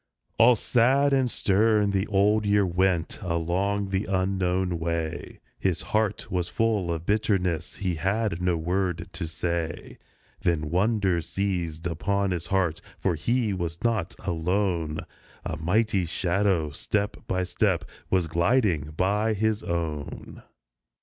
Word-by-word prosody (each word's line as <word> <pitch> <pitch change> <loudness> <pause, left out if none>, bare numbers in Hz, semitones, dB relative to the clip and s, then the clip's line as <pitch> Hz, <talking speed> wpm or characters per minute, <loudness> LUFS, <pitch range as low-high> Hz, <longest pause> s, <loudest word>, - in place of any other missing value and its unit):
All 120 +2 +7
sad 130 +5 +3
and 130 -2 +3
stern 105 0 +2
the 100 +1 0
Old 105 +2 +3
Year 100 -1 +3
went, 90 -2 0
along 95 +3 -1
the 95 +1 -1
unknown 95 -2 0
way; 85 0 -3 0.2
His 95 -3 0
heart 110 -2 0
was 90 -1 -1
full 105 -6 +1
of 80 0 -4
bitterness, 95 -5 0
he 95 -2 -2
had 95 +2 -1
no 90 -1 +1
word 90 0 -1
to 85 -1 -4
say. 85 0 -3 0.4
Then 75 -3 0
wonder 95 -2 +2
seized 85 -3 -3
upon 100 +4 0
his 85 -2 -3
heart, 90 -4 0 0.2
for 95 - 0
he 110 +7 0
was 85 -2 -4
not 110 -7 0
alone; 85 -2 0 0.4
A - - -2
mighty 95 +3 +1
shadow 90 -2 +1
step 100 +7 -1
by 95 0 0
step 90 - 0 0.2
was 95 -2 +2
gliding 85 - +1
by 105 +4 +1
his 110 +1 0
own 80 -4 -4
95 Hz, 130 wpm, -26 LUFS, 85-105 Hz, 0.4 s, All